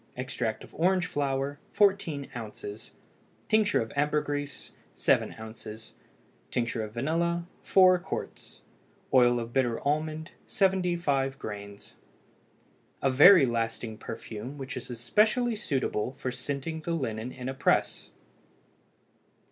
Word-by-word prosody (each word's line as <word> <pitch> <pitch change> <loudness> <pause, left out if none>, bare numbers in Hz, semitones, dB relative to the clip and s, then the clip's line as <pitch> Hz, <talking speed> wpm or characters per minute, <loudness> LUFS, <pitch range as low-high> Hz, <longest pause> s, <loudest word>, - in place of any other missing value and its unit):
Extract 125 -3 -3
of - - -14
orange 180 +2 +2
flower 140 -1 -2
14 190 -9 +2
oz. 110 -2 -7 0.6
Tincture 215 - +3
of 115 - -5
ambergris 145 -1 -1 0.2
7 - - +2
oz. 110 0 -9 0.6
Tincture 115 -1 -1
of 105 - -6
vanilla 170 +8 0 0.2
4 185 -1 +5
qts. - - -7 0.5
Oil 120 -2 +5
of 115 0 -6
bitter 125 -3 +1
almond 155 +2 -1 0.2
75 175 -8 +1
grains. 100 -1 -8 1.1
A 135 - +3
very 150 +4 +8
lasting 115 -2 -2
perfume 115 +4 -7
which 135 +1 -6
is - - -6
especially 215 - +2
suitable 130 - -1
for 130 -1 -4
scenting 140 +5 -4
the 170 +2 -2
linen 120 -6 -3
in 125 0 -7
a 130 - -2
press. 135 - +1
135 Hz, 115 wpm, -28 LUFS, 120-165 Hz, 1.1 s, very